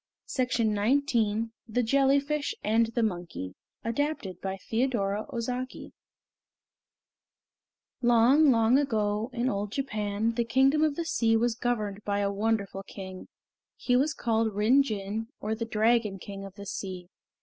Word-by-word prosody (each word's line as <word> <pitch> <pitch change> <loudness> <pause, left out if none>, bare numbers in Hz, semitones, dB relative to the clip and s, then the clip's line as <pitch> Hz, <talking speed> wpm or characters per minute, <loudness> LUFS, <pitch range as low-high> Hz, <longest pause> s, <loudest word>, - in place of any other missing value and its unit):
MYTHS - - -6 0.2
OF 225 - +3 0.4
JAPAN 225 -3 0 0.2
THE 245 +2 0
JELLYFISH 280 +4 +2
AND 225 +2 +3
THE 235 - +2
MONKEY 175 - -3 0.3
ADAPTED 230 - -2
BY 190 -1 -2
YEI 195 - -8 0.3
THEODORA 205 -4 -1
OZAKI 250 +2 -4 2.1
Long, 245 +5 +5
long 230 +1 +4
ago, 215 -4 0
in 245 0 -1
old 205 -3 -2
Japan, 215 -4 -1
the 235 +1 0
Kingdom 270 +6 +3
of 305 -2 +2
the 335 - -3
Sea 225 -7 +2
was 235 +1 +1
governed 215 -4 -2
by 205 0 0
a 200 0 +1
wonderful 200 -2 -1
King. 190 -1 -9 0.5
He 245 - 0
was 280 +4 +2
called 225 -2 0
Rin 225 +7 +5
Jin, 215 -2 -3
or 215 +1 -2
the 230 +1 -3
Dragon 220 -2 +2
King 195 +1 -8
of 195 -1 -11
the 200 0 -9
Sea. 185 -2 -5
225 Hz, 145 wpm, -28 LUFS, 205-250 Hz, 2.1 s, Long